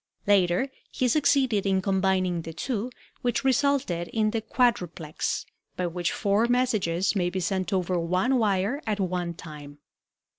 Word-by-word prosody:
Later 190 +3 +3 0.2
he 255 - 0
succeeded 260 -5 +2
in 190 -1 +2
combining 190 -2 +1
the 165 0 -8
two, 230 - -3 0.3
which 245 +2 0
resulted 265 -10 +1
in 215 -1 0
the 225 0 -1
quadruplex, 180 - -1 0.3
by 180 - -1
which 175 0 -1
four 205 +3 +1
messages 215 -8 +1
may 175 -3 +1
be 185 +1 -3
sent 185 +2 -1
over 185 -2 0
one 185 +10 +1
wire 210 +5 +1
at 210 -1 -1
one 180 -2 -2
time. 150 -4 -10
190 Hz, 145 wpm, -26 LUFS, 175-235 Hz, 0.3 s, Later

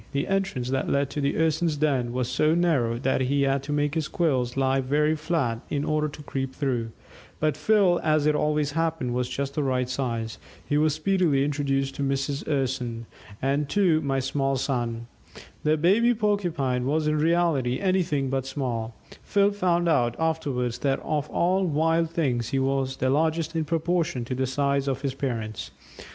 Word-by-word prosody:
The 140 0 0
entrance 190 -11 -1
that 135 0 -1
led 140 0 +1
to 150 - -3
the 140 0 0
Urson's 160 0 +1
den 135 -5 +1
was 125 0 -1
so 155 +5 +2
narrow 140 -10 +1
that 130 +2 0
he 140 +2 +1
had 135 0 +1
to 145 - -6
make 145 0 0
his 160 -3 -1
quills 130 -7 0
lie 135 0 +2
very 150 +4 +1
flat 150 -7 -1
in 145 -1 -1
order 155 0 +1
to 150 0 -10
creep 135 -2 -4
through, 125 -5 -1 0.5
but 155 -1 +1
Phil, 200 -5 +3
as 155 -1 +2
it 150 - +4
always 150 -1 0
happened, 160 -5 -1
was 125 0 -1
just 140 +2 -3
the 150 - -1
right 130 -2 0
size. 120 -3 -3 0.3
He 145 - 0
was 150 0 +3
speedily 155 -5 +2
introduced 135 -2 -1
to - - -3
Mrs. 140 +1 -1
Urson 125 -4 -2 0.4
and 140 +2 0
to 175 -5 +3
"my 135 -2 -1
small 135 +1 0
son." 120 -3 -2 0.6
The 155 +1 +2
baby 215 +10 +3
Porcupine 170 - 0
was 155 +2 +1
in 150 0 +1
reality 155 -6 +2
anything 170 -8 0
but 135 -1 -1
"small"; 120 -5 -3 0.3
Phil 200 0 +2
found 175 -4 +1
out 120 -7 +2
afterwards 140 -7 -1
that 135 -1 0
of 150 -1 -2
all 185 +3 +1
wild 165 +1 +1
things 130 -9 -1
he 135 - -1
was 135 0 0
the 130 0 +1
largest 160 +2 0
in 160 -1 0
proportion 165 -4 -1
to 130 - -4
the 130 +1 -1
size 140 +1 0
of 135 0 -2
his 135 -2 -1
parents. 115 -6 -4
140 Hz, 180 wpm, -25 LUFS, 130-160 Hz, 0.6 s, it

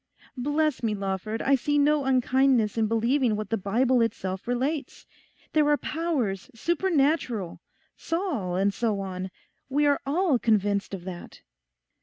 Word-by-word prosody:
Bless 295 +2 0
me, 220 -3 0
Lawford, 200 +3 -3
I 275 - +3
see 290 +2 +1
no 290 0 +3
unkindness 255 -3 +2
in 225 -1 +1
believing 230 +2 +1
what 215 -1 -5
the - - +3
Bible 235 +5 +2
itself 190 -4 -2
relates. 270 +5 -2 0.5
There 300 -1 +3
are 295 - +4
powers 295 - -2
supernatural. 290 - 0 0.4
Saul, 315 - -2
and 195 +2 +1
so 215 -2 -1
on. 190 -1 -4 0.4
We 290 +2 +2
are 285 -1 +2
all 300 -1 +1
convinced 205 -3 +1
of 180 - -10
that. 180 -1 -9
245 Hz, 140 wpm, -26 LUFS, 200-290 Hz, 0.5 s, are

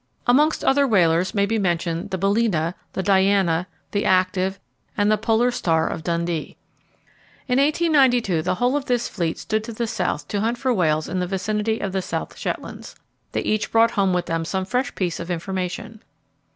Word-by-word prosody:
Amongst 295 +6 +3
other 280 +1 +3
whalers 180 -4 +2
may 200 -1 +3
be 220 +2 0
mentioned 175 0 -1
the 190 - -2
Balæna, 195 -4 +1 0.2
the 190 - -2
Diana, 190 -3 +2 0.2
the 205 - 0
Active, 185 +1 +1 0.4
and 205 0 +3
the 215 - +3
Polar 235 +2 +2
Star 165 -8 +1
of - - -4
Dundee. 170 -1 -2 0.9
In 250 0 +2
1892 275 - +3
the 180 +3 -1
whole 245 +6 +1
of 290 -2 -1
this 245 -3 0
fleet 170 -4 -2
stood 215 -1 -2
to 230 - -7
the 235 +2 -2
South 225 -1 -2
to 205 - -1
hunt 230 +3 0
for 260 0 0
whales 155 -6 +1
in 185 +2 -2
the 180 - -1
vicinity 210 +4 -1
of 195 - -3
the 190 0 -1
South - - -4
Shetlands. - - -6 0.4
They - - 0
each 215 0 -1
brought 230 0 +4
home 195 -4 +1
with 180 -1 0
them 165 -1 -2
some 190 +3 -2
fresh 250 +6 -1
piece 180 -3 -2
of 170 - -6
information. 185 +5 -4
195 Hz, 185 wpm, -22 LUFS, 180-230 Hz, 0.9 s, brought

